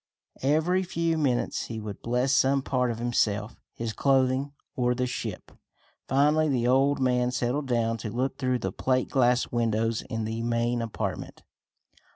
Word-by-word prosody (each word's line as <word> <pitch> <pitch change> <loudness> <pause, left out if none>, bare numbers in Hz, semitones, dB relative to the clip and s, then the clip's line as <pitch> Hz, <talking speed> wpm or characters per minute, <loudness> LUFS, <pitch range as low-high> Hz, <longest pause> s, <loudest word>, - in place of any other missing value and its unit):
Every 160 +7 +2
few 170 -2 -1
minutes 130 -5 0
he 115 -1 -5
would 105 -2 -7
bless 125 +3 0
some 135 -1 +3
part 125 -2 0
of 115 - -3
himself, 110 -3 -1
his 115 -1 -4
clothing, 135 +1 +2 0.2
or 125 -1 +1
the 125 +1 0
ship. 125 - -5 0.6
Finally 150 +3 +3
the 125 -3 +1
old 135 +3 +3
man 125 -1 +2
settled 125 +3 -1
down 115 -2 +1
to 110 0 -5
look 125 +6 -2
through 130 -2 +1
the 95 -5 -3
plate 130 +5 0
glass 125 -2 +2
windows 115 -1 0
in 115 0 -2
the 110 +1 -3
main 120 0 0
apartment. 105 -5 -5
125 Hz, 160 wpm, -27 LUFS, 115-135 Hz, 0.6 s, some